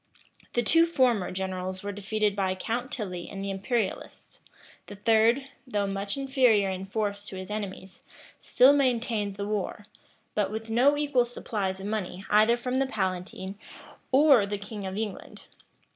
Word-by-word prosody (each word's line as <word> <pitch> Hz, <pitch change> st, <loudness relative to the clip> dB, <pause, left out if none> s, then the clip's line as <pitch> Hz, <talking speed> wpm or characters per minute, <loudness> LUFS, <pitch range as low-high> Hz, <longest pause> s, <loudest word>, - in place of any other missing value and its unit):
The 240 Hz, -, +1 dB
two 330 Hz, +8 st, +4 dB
former 250 Hz, -, +2 dB
generals 185 Hz, 0 st, -4 dB
were 205 Hz, -, -3 dB
defeated 205 Hz, +1 st, -1 dB
by 190 Hz, -2 st, 0 dB
Count 240 Hz, +7 st, -3 dB
Tilly 185 Hz, -7 st, -4 dB
and 195 Hz, 0 st, -6 dB
the 200 Hz, -, -2 dB
imperialists: 195 Hz, +2 st, -3 dB, 0.5 s
the 205 Hz, -, -8 dB
third, 225 Hz, +5 st, +3 dB, 0.2 s
though 205 Hz, -4 st, 0 dB
much 200 Hz, +3 st, -2 dB
inferior 250 Hz, -8 st, +3 dB
in 190 Hz, +1 st, -5 dB
force 205 Hz, 0 st, -2 dB
to 195 Hz, -, -8 dB
his 185 Hz, +2 st, -7 dB
enemies, 195 Hz, -2 st, -6 dB, 0.4 s
still 265 Hz, +3 st, +5 dB
maintained 235 Hz, -7 st, +1 dB
the 200 Hz, 0 st, -4 dB
war; 210 Hz, 0 st, -3 dB, 0.5 s
but 205 Hz, -2 st, 0 dB
with 220 Hz, +1 st, -5 dB
no 270 Hz, +6 st, +4 dB
equal 285 Hz, -4 st, +2 dB
supplies 200 Hz, -5 st, -3 dB
of 190 Hz, -, -7 dB
money 200 Hz, -3 st, -4 dB
either 215 Hz, +3 st, +5 dB
from 250 Hz, +2 st, -1 dB
the 270 Hz, -, +1 dB
palatine 190 Hz, -2 st, -3 dB, 0.5 s
or 265 Hz, -6 st, +6 dB
the 205 Hz, 0 st, -2 dB
king 200 Hz, 0 st, -6 dB
of 190 Hz, +1 st, -5 dB
England. 215 Hz, -2 st, -5 dB
210 Hz, 160 wpm, -27 LUFS, 195-240 Hz, 0.5 s, or